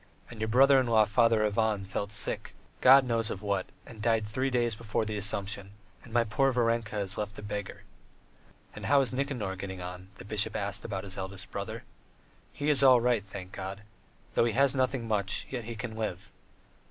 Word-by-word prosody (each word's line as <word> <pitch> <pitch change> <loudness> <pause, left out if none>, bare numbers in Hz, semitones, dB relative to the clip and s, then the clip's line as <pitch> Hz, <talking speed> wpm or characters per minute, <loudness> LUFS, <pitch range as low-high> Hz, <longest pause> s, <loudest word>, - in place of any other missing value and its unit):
And 115 -2 -9
your 110 - 0
brother 135 +4 +6
in 130 - 0
law 110 -2 +5
Father 110 +1 +3
Ivan 105 -1 0
fell 100 +1 -3
sick, 105 - -2 0.3
God 135 +1 +8
knows 115 -3 +1
of 95 - -5
what, 100 -2 -1 0.2
and 110 -2 -11
died 115 -1 +2
three 130 +6 -1
days 120 -2 +1
before 110 0 -2
the 110 0 -3
Assumption; 100 -1 -2 0.3
and 120 - -14
my 120 0 +3
poor 135 +5 +1
Varenka 115 -3 0
is 95 -1 -3
left 105 0 -4
a - - -8
beggar." 105 -1 -5 0.9
"And - - -6
how 140 -1 +5
is 130 -2 -1
Nikanor 125 -8 -2
getting 95 -1 -6
on?" 90 +1 -7
the 95 - -12
bishop 105 +1 -1
asked 100 0 -2
about 95 -4 -4
his 95 -1 -7
eldest 95 0 -7
brother. - - -5 0.7
"He 145 +1 0
is 140 -3 +6
all 130 -2 +7
right, 120 -3 +1
thank 95 -2 -9
God. 95 +1 -6 0.5
Though - - +3
he 115 - 0
has 135 +2 +4
nothing 130 -3 0
much, 100 -3 0
yet 120 -4 -4
he 115 0 -6
can 110 +1 -6
live. 105 -4 -4
110 Hz, 200 wpm, -29 LUFS, 100-120 Hz, 0.9 s, God